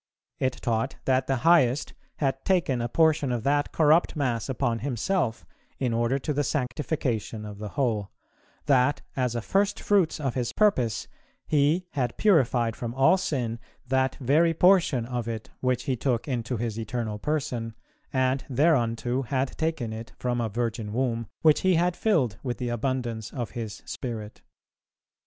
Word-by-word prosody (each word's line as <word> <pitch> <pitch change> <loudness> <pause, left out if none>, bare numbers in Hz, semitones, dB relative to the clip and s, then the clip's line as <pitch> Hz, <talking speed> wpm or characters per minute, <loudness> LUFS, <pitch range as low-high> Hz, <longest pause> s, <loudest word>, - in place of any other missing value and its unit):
It 130 -1 +1
taught 115 +3 0
that 130 0 +2
the 135 - +2
Highest 150 -6 +4 0.2
had 135 -2 -1
taken 170 -10 +1
a 120 - -2
portion 155 -2 +3
of 120 -3 -2
that 145 +1 +1
corrupt 160 +2 +3
mass 125 -5 -1
upon 120 -3 0
Himself, 130 - -1 0.3
in 125 -3 -1
order 120 +3 +1
to 150 +2 -2
the 145 +1 +1
sanctification 125 -6 -2
of 105 -1 -8
the 105 -1 -5
whole; 110 -7 0 0.6
that, 135 0 +3
as 125 -3 0
a 120 - -2
firstfruits 200 - +1
of 135 -5 -1
His 120 -2 -2
purpose, 125 - +2 0.4
He 155 +4 +2
had 125 -4 -2
purified 125 - +3
from 120 0 -5
all 135 +7 +5
sin 130 -11 -2 0.3
that 130 0 +2
very 155 +6 +2
portion 170 -9 +4
of 120 -1 -3
it 110 -2 -5
which 130 -1 0
He 130 - 0
took 125 -1 -1
into 125 -2 -2
His 115 -1 -3
Eternal 110 -2 -3
Person, 125 -5 -2 0.4
and 130 0 +1
thereunto 125 -3 +2
had 130 0 -2
taken 160 -9 -2
it 115 +1 -8
from 120 -1 -1
a 115 - -1
Virgin 115 -1 -3
Womb, 115 -2 -1 0.2
which 155 -2 +5
He 185 -1 +3
had 175 +1 +2
filled 135 - +1
with 125 -3 -3
the 125 -1 -3
abundance 120 -2 -2
of 120 -5 -4
His 115 -3 -6
Spirit. 110 -4 -6
130 Hz, 160 wpm, -26 LUFS, 115-145 Hz, 0.6 s, all